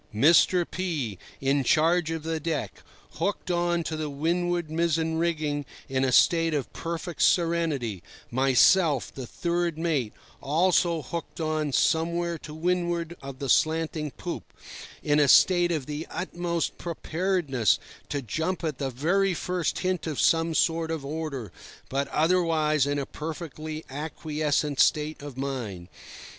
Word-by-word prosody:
Mr. 170 - +5
P—, 150 - -3 0.2
in 135 +1 +2
charge 160 +5 +3
of 165 -1 -3
the 160 0 -2
deck, 150 - -3 0.4
hooked 185 +1 -1
on 175 -1 +1
to 160 - -3
the 155 -1 -3
windward 170 +3 -1
mizzen 160 0 0
rigging 155 -4 0 0.2
in 130 0 0
a 130 - +2
state 165 +4 +4
of 140 - -3
perfect 170 +1 -5
serenity; 160 - +1 0.3
myself, 135 +4 +4
the 130 -3 -7
third 170 +1 -1
mate, 155 -9 0 0.3
also 170 +1 +2
hooked 170 +6 -6
on 155 -2 -1
somewhere 170 +3 +1
to 150 - -10
windward 170 +1 -1
of 135 -1 -8
the 140 - -4
slanting 155 +2 +1
poop, - - -7 0.5
in 150 0 +3
a 145 - +4
state 175 +4 +5
of 155 -6 -1
the 150 +3 -5
utmost 175 -2 -3
preparedness 165 - 0 0.3
to 140 -1 -2
jump 160 - -2
at 155 -5 -2
the 135 -2 -1
very 175 +9 +1
first 180 -1 -1
hint 185 -3 -1
of 155 -4 -3
some 165 0 +3
sort 165 0 +2
of 160 -4 -3
order, 140 - -4 0.4
but 140 +1 -1
otherwise 155 -3 +2
in 145 0 0
a 140 - -2
perfectly 155 0 -6
acquiescent 150 0 -2
state 150 0 +2
of 145 -3 -8
mind. 120 -10 -4
160 Hz, 140 wpm, -27 LUFS, 145-170 Hz, 0.5 s, Mr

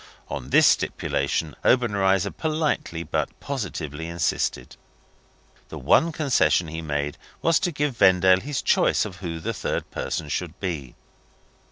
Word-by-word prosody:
On 65 - -5
this - - +6
stipulation 80 -2 0
Obenreizer 100 -5 +2
politely 155 - -2
but 75 - -3
positively 80 - -5
insisted. 85 -6 -2 0.9
The - - -7
one 165 - +3
concession 135 - +2
he 80 +1 -5
made 75 -2 -3 0.2
was 165 -1 +4
to 180 - -1
give 145 -4 -2
Vendale 95 -2 +5
his 140 +1 -3
choice - - +3
of 95 -4 -8
who 85 -3 -5
the - - -3
third - - -3
person 80 - -3
should 85 +3 -4
be. 80 -10 -4
95 Hz, 135 wpm, -24 LUFS, 80-130 Hz, 0.9 s, this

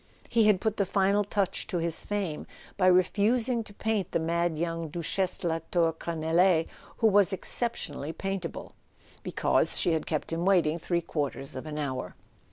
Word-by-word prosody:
He 230 -2 +4
had 210 -3 +5
put 220 +2 -1
the 200 - +2
final 200 +2 +2
touch 200 -1 -1
to 180 - -2
his 165 -1 0
fame 195 -7 -3 0.3
by 185 -2 +2
refusing 220 +6 +3
to 210 - -10
paint 210 -2 -2
the - - +2
mad 170 0 0
young 165 0 -2
Duchesse 175 +3 -1
de 175 - -3
la 165 0 0
Tour 165 -2 +2
Crenelee—who 165 +5 0
was 205 -2 +4
exceptionally 190 - -3
paintable 190 0 -5 0.5
—because - - +1
she 175 - +2
had 160 - -2
kept 155 +1 -2
him 165 +1 -1
waiting 170 -4 +3
three 170 +1 0
quarters 145 -4 -4
of 130 +4 -6
an 150 -1 -5
hour. 130 -4 -3
175 Hz, 170 wpm, -28 LUFS, 160-200 Hz, 0.5 s, had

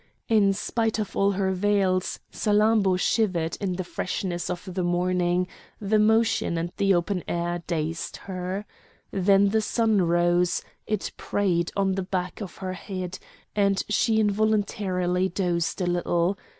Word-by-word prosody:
In 210 -3 +4
spite 225 +3 -1
of 215 -3 -4
all 200 0 +3
her 190 0 0
veils, 190 -1 +1 0.2
Salammbô 210 -3 +3
shivered 180 -7 +1
in 190 -2 -1
the 185 +1 -3
freshness 175 0 -3
of 180 +1 -5
the 185 - -1
morning; 180 0 +1 0.3
the 215 +1 +2
motion 220 -4 +2
and 170 +1 -2
the 195 -1 +3
open 175 +1 -1
air 175 0 -2
dazed 165 -1 -3
her. 185 +1 -4 0.5
Then 195 +1 +4
the 220 +2 +2
sun 220 -2 +2
rose; 175 +1 +2 0.2
it 215 -2 -2
preyed 175 -4 0
on 195 -1 +2
the 190 0 -1
back 180 +1 -3
of 190 -4 -7
her 185 - -2
head, 185 -1 -6 0.4
and 200 -1 +2
she 220 +1 +2
involuntarily 200 -4 +1
dozed 175 -2 -1
a - - +1
little. 175 +1 +1
190 Hz, 145 wpm, -26 LUFS, 175-205 Hz, 0.5 s, In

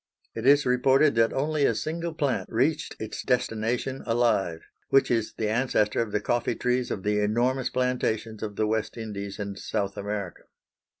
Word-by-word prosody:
It 115 +3 -3
is 145 +1 +6
reported 130 +4 +4
that 115 0 +3
only 150 +2 0
a - - +3
single 170 +2 -3
plant 145 -4 -1
reached 135 +8 0
its 110 - -5
destination 125 +1 -1
alive, 115 -8 +1 0.3
which 135 - +4
is 115 -2 0
the 110 - 0
ancestor 110 -2 +1
of 115 -2 -3
the 105 - +1
coffee 120 +2 0
trees 125 0 0
of 95 - -4
the 105 0 +1
enormous 120 +5 +1
plantations 115 -4 -1
of 105 -2 -4
the 110 - +1
West 110 +1 -1
Indies 100 -3 -5
and 100 -1 -5
South 100 -1 -2
America. 100 -3 -5
115 Hz, 170 wpm, -26 LUFS, 105-130 Hz, 0.3 s, is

